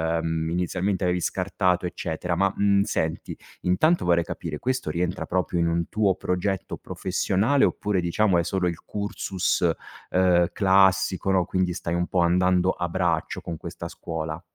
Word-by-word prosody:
ehm, 80 -1 -1
inizialmente 90 +3 -1
avevi 90 0 +1
scartato, 90 -1 0
eccetera. 85 0 -3
Ma, 100 +2 +2
mhmm, 100 -1 +3
senti, 80 -5 -2 0.2
intanto 155 - +2
vorrei 85 -1 +3
capire: 80 -3 -5
questo 130 - -2
rientra 85 +2 -2
proprio 90 -1 -1
in 85 - +2
un 85 0 0
tuo 100 -4 +1
progetto 95 +1 -2
professionale 100 +8 0
oppure, 105 -3 +1
diciamo, 85 +4 -2
è 90 -5 +3
solo 90 -2 0
il 85 - -6
cursus, 95 -4 -1 0.4
ehm, 90 -2 +4
classico, 95 0 +3
no, 95 -2 +3
quindi 90 0 -1
stai 85 0 -4
un 90 0 0
po' 90 - 0
andando 90 +1 +3
a 90 - -3
braccio 85 -1 -1
con 85 -2 -6
questa - - -7
scuola? 80 0 -5
90 Hz, 155 wpm, -25 LUFS, 85-95 Hz, 0.4 s, ehm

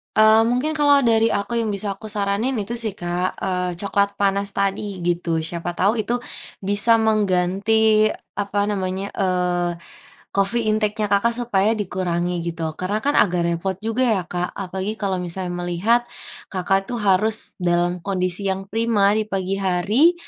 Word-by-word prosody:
Eee, 220 +1 +6
mungkin 250 +6 0
kalau 285 -1 +5
dari 225 -2 +3
aku 215 +2 -1
yang 220 -3 -1
bisa 200 -1 -3
aku 220 - -10
saranin 210 +4 0
itu 230 +1 -3
sih, 220 -4 +1
Kak, 175 0 -2
eee, 180 -1 -2
coklat 200 +2 0
panas 200 0 0
tadi 195 -1 -2
gitu. 170 -2 -1
Siapa 170 +2 -4
tahu 205 +6 +1
itu 245 +1 -1 0.4
bisa 205 +4 +5
mengganti 215 +1 +2 0.3
apa 200 0 -1
namanya, 190 0 -3
eee, 180 -2 0 0.6
coffee 215 +3 0
intake-nya 215 -1 0
Kakak 215 +4 +2
supaya 225 -3 +1
dikurangi 180 -3 -2
gitu. 165 -1 -4 0.2
Karena 195 +4 -1
kan 285 +3 0
agak 180 -3 +2
repot 170 +3 -1
juga 225 +4 0
ya, 210 -5 +1
Kak, 180 0 -4
apalagi 190 +2 -4
kalau 195 -4 -2
misalnya 180 +1 -3 0.2
melihat 225 +8 +1 0.4
Kakak 195 +1 -1
itu 245 - -5
harus 210 +1 +2
dalam 175 0 0
kondisi 185 +1 -1
yang 190 0 -4
prima 215 -2 +2
di 215 - -1
pagi 195 -1 -2
hari, 195 - +3
200 Hz, 155 wpm, -21 LUFS, 180-220 Hz, 0.6 s, Eee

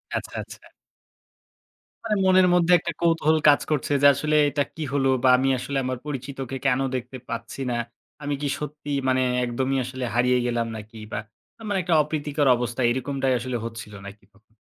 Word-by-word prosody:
আচ্ছা, - - -5
আচ্ছা। - - -14 1.4
মানে 220 -2 0
মনের 185 -1 +5
মধ্যে 175 0 +3
একটা 170 - -4
কৌতূহল 165 -2 +3
কাজ 145 - +5
করছে 145 -1 -1
যে, 145 - +8
আসলে 155 +3 -1
এটা 145 +1 0
কি 160 - -4
হলো 135 -1 +2
বা 130 - +5
আমি 135 +1 +1
আসলে 140 +2 -3
আমার 130 0 -2
পরিচিতকে 135 -2 -5
কেনো 135 0 +2
দেখতে 130 +1 -5
পাচ্ছি 115 +3 -5
না? - - -1 0.5
আমি 145 - -2
কি 145 - -1
সত্যিই 145 -1 -4
মানে 130 0 +2 0.2
একদমই 130 +3 -1
আসলে 130 0 -6
হারিয়ে 125 +1 +3
গেলাম 120 -1 -1
নাকি 110 +1 -10
বা - - -2 0.5
মানে 200 -2 +1
একটা 170 -1 0
অপ্রীতিকর 145 -1 -1
অবস্থা, 120 +1 -3
এরকমটাই 130 +1 0
আসলে 125 +1 -3
হচ্ছিল 115 -2 -8
নাকি 100 +1 -12
তখন? 110 +2 -29
135 Hz, 170 wpm, -24 LUFS, 125-150 Hz, 1.4 s, যে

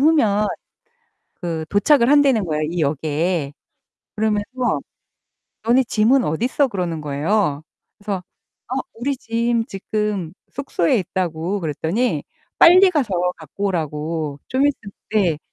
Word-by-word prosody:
후면 225 -9 +3 0.9
그 165 -2 -4
도착을 235 +5 +4
한다는 280 -6 +4
거예요, 155 -3 -1
이 165 +2 -2
역에. 150 +1 -1 0.6
그러면서 220 +4 0 0.8
"너네 245 +3 +3
짐은 235 +3 +3
어딨어?" 245 - +1
그러는 180 -7 -3
거예요. 150 +2 0 0.4
그래서 205 -3 -4 0.5
"어 265 - 0
우리 265 +4 -2
짐 230 0 0
지금 200 -4 -3 0.2
숙소에 255 -6 +1
있다"고 180 0 -2
그랬더니 165 - -1 0.4
빨리 370 +3 +8
가서 195 - 0
갖고 160 +5 -7
오라고. 155 -3 -2
좀 265 +2 +2
있으면 225 -8 -3 0.2
네. 185 -8 +2
200 Hz, 250 characters per minute, -21 LUFS, 160-240 Hz, 0.9 s, 빨리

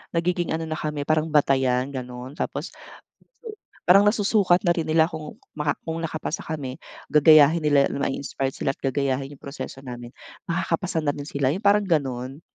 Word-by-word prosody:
nagiging 175 0 0
ano 165 0 -3
na 155 0 -3
kami 150 -2 -3
parang 155 0 +1
batayan 135 -3 +2
gano'n. 125 0 -7
Tapos, - - -4 1.1
parang 195 +3 +7
nasusukat 205 -4 +3
na 175 - +4
rin 165 - -1
nila 160 0 +4
kung 155 -2 -8 0.2
maka 150 -1 0
kung 165 0 -2
nakapasa 155 0 -3
kami 140 -5 -5 0.3
gagayahin 155 +1 +6
nila 145 -2 +4
ma-inspired 135 -1 -2
sila - - -1
at - - -51
gagayahin 135 0 -1
'yong - - -23
proseso 135 -1 -7
namin, 120 -2 -8 0.4
makakapasa 170 +1 -1
na 145 - +2
rin 145 0 -7
sila 140 -3 0
'yong 190 - -6
parang 205 0 +4
gano'n. 135 -3 -1
150 Hz, 165 wpm, -24 LUFS, 135-165 Hz, 1.1 s, parang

